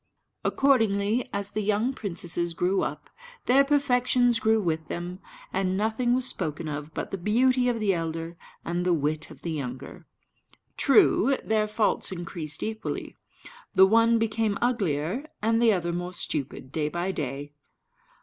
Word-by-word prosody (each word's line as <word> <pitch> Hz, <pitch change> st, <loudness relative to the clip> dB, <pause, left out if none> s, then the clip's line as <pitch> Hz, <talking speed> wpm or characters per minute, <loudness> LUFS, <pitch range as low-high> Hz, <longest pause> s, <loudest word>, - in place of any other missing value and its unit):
Accordingly, 225 Hz, -4 st, +2 dB
as 200 Hz, 0 st, -3 dB
the 215 Hz, -, -2 dB
young 215 Hz, +5 st, +1 dB
princesses 175 Hz, -5 st, -3 dB
grew 185 Hz, +3 st, +1 dB
up, -, -, -5 dB, 0.3 s
their 270 Hz, +3 st, +5 dB
perfections 250 Hz, -4 st, +2 dB
grew 220 Hz, 0 st, +3 dB
with 160 Hz, -5 st, -2 dB
them; 175 Hz, +2 st, -5 dB, 0.3 s
and 190 Hz, 0 st, 0 dB
nothing 225 Hz, +4 st, +1 dB
was 255 Hz, 0 st, +1 dB
spoken 160 Hz, -, -2 dB
of 150 Hz, +1 st, -5 dB
but -, -, -4 dB
the 195 Hz, -, -4 dB
beauty 250 Hz, +6 st, +3 dB
of 235 Hz, -2 st, -1 dB
the 205 Hz, -3 st, +2 dB
elder 165 Hz, 0 st, -4 dB, 0.3 s
and 175 Hz, +1 st, -1 dB
the 180 Hz, -1 st, +2 dB
wit 155 Hz, +1 st, -1 dB
of -, -, -14 dB
the 170 Hz, -, -3 dB
younger. 135 Hz, -4 st, -6 dB, 0.7 s
True, 270 Hz, -1 st, +4 dB
their 215 Hz, -1 st, +1 dB
faults 210 Hz, -1 st, 0 dB
increased 170 Hz, -3 st, -3 dB
equally: 220 Hz, 0 st, -4 dB, 0.6 s
the 190 Hz, -, +8 dB
one 230 Hz, +3 st, +4 dB
became 220 Hz, -2 st, 0 dB
uglier, 220 Hz, -, -1 dB
and 225 Hz, +2 st, +1 dB
the 230 Hz, -2 st, +5 dB
other 175 Hz, -3 st, -1 dB
more 175 Hz, +1 st, -4 dB
stupid, 135 Hz, -5 st, -3 dB
day 150 Hz, -1 st, -1 dB
by 175 Hz, +4 st, -2 dB
day. 145 Hz, -2 st, -5 dB
195 Hz, 150 wpm, -26 LUFS, 165-230 Hz, 0.7 s, the